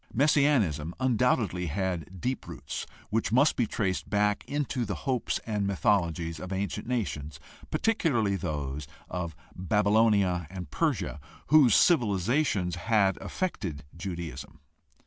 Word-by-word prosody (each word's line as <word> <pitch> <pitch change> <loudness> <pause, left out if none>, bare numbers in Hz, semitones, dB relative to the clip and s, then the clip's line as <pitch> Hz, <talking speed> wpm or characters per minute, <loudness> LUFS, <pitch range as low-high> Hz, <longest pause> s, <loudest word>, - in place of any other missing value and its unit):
Messianism 120 - +2
undoubtedly 115 -8 +1
had 90 +1 -3
deep 130 +5 -3
roots - - -6 0.2
which 110 0 0
must 135 +6 +4
be 120 - +1
traced 95 -3 -2
back 105 0 +1
into 140 -4 -2
the 100 -3 -3
hopes 130 -4 0
and 105 -3 -1
mythologies 85 -5 0
of 90 +2 -7
ancient 95 +3 -3
nations, 75 - -3 0.3
particularly 135 - +1
those 75 -4 -4 0.2
of 85 -3 -3 0.2
Baylonia 100 -2 +2
and 90 -5 -7
Persia, 75 - -1 0.3
whose 140 -8 +7
civilizations 105 - +2
had 100 -1 +2
affected 90 - -4
Judaism. 85 -6 -6
100 Hz, 115 wpm, -28 LUFS, 85-120 Hz, 0.3 s, whose